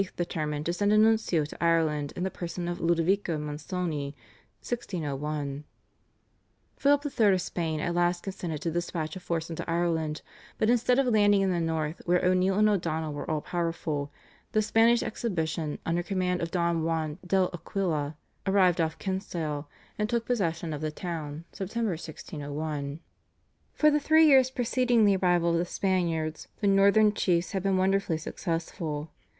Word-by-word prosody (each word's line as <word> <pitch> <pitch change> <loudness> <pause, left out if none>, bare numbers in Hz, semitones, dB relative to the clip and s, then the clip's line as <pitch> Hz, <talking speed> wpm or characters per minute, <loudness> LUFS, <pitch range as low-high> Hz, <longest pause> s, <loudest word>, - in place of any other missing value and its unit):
determined 155 -3 -2
to 170 - 0
send 205 +3 +1
a 215 - +5
nuncio 215 -7 +3
to 155 - -7
Ireland 155 -3 +2
in 180 - -3
the 190 - -1
person 175 0 -5
of 175 0 -4
Ludovico 170 +1 +1
Mansoni 150 -1 -3 0.5
(1601). 150 - -3 1.1
Philip 285 +1 +3
III. 220 -8 +3
of 185 - +1
Spain 160 -3 -2
at 175 +3 -1
last 175 0 +1
consented 175 -6 -4
to 165 - -1
dispatch 170 -1 -3
a - - -5
force 170 -2 -3
into 165 - -5
Ireland, 165 -2 0 0.3
but 220 - +3
instead 245 +1 +3
of 275 - +3
landing 205 -4 +4
in 190 -1 +2
the 175 - 0
North 160 -1 -2
where 180 +1 +2
O'Neill 185 +1 +3
and 215 0 +5
O'Donnell 160 -6 0
were 145 - -5
all 155 -1 0
powerful, 165 -4 -2 0.4
the 215 -1 +3
Spanish 230 +2 +4
exhibition 160 -8 -2
under 170 +1 0
command 180 -1 -1
of 165 - -2
Don 170 -1 0
Juan 160 -2 -1
del 185 0 +1
Aquila 165 -4 -2 0.3
arrived 185 -3 +4
off 160 -1 -1
Kinsale, 165 -6 -3 0.3
and 210 0 0
took 235 -1 0
possession 170 -8 -1
of 150 - -5
the 155 - -1
town 155 -1 -5
(Sept. 195 +3 -6
1601). 155 -6 -4 0.7
For 305 0 +5
the 295 - +3
three 315 +2 +5
years 265 -4 +6
preceding 245 -2 +2
the 200 -1 +4
arrival 175 -2 +2
of 170 - +2
the 175 - 0
Spaniards 170 -4 -1
the - - -2
Northern 200 +2 +5
chiefs 175 -4 +1
had 195 - -1
been 195 0 +1
wonderfully 190 -3 +1
successful. 160 -2 -4
175 Hz, 160 wpm, -28 LUFS, 160-195 Hz, 1.1 s, years